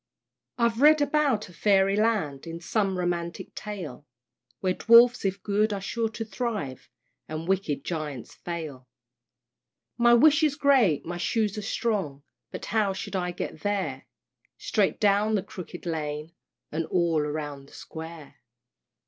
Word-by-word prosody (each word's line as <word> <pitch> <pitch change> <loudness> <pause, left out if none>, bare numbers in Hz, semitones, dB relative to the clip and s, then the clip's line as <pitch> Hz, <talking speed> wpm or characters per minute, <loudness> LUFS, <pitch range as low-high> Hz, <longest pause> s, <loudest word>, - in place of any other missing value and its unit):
I've 235 0 +1
read 305 +1 +7
about 290 -7 +1
a 180 - -15
Fairy 195 +2 +3
Land, 205 -11 0
In 165 0 -6
some 190 +2 0
romantic 175 -1 -3
tale, 165 -10 -7 0.5
Where 185 -1 +1
Dwarfs 235 +3 +6
if 195 0 -1
good 210 +1 +1
are 200 - -2
sure 225 +3 -2
to 225 +1 -5
thrive 215 - -4 0.4
And 155 +2 -5
wicked 185 -7 0
Giants 150 -7 -4
fail. 155 -7 -6 1.1
My 240 0 +6
wish 300 +5 +6
is 300 -3 +2
great, 260 - +3
my 175 +1 -4
shoes 210 +2 0
are 210 - -4
strong, 195 -10 -2 0.3
But - - -7
how 210 -3 +1
shall 190 0 -3
I 180 - -2
get 170 -2 -5
there? 190 -10 -2 0.5
"Straight 205 -4 0
down 210 +1 +3
the 195 - 0
Crooked 180 -1 -9
Lane, 155 -1 -3 0.4
And 160 +1 -2
all 170 -3 +2
round 145 -2 -4
the - - -19
Square." 160 -2 -9
190 Hz, 145 wpm, -27 LUFS, 160-220 Hz, 1.1 s, read